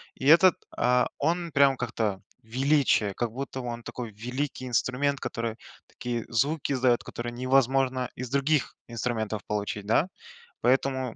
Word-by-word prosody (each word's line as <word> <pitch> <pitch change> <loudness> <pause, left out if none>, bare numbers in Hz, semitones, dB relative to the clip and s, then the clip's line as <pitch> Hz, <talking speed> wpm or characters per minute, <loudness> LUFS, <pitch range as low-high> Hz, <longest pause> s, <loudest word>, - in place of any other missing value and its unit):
и 135 - -7
этот, 170 +3 +7 0.2
а, 125 0 +3
он 170 +3 0
прям 140 -2 +4
как-то, 110 -5 -2 0.2
величие, 130 -4 +2
как 120 +1 -2
будто 130 +1 -5
он 120 -1 -5
такой 120 -3 -6
великий 130 +4 -4
инструмент, 130 +3 0
который 115 -1 -3 0.3
такие 120 -2 -4
звуки 140 +5 0
издает, 125 -2 +2
которые 120 0 -6
невозможно 130 0 +2
из 125 -1 -5
других 140 +1 +1
инструментов 110 -3 -2
получить, 105 -1 -3
да. 130 - +3 0.5
Поэтому 130 -1 +1
125 Hz, 135 wpm, -27 LUFS, 115-135 Hz, 0.5 s, этот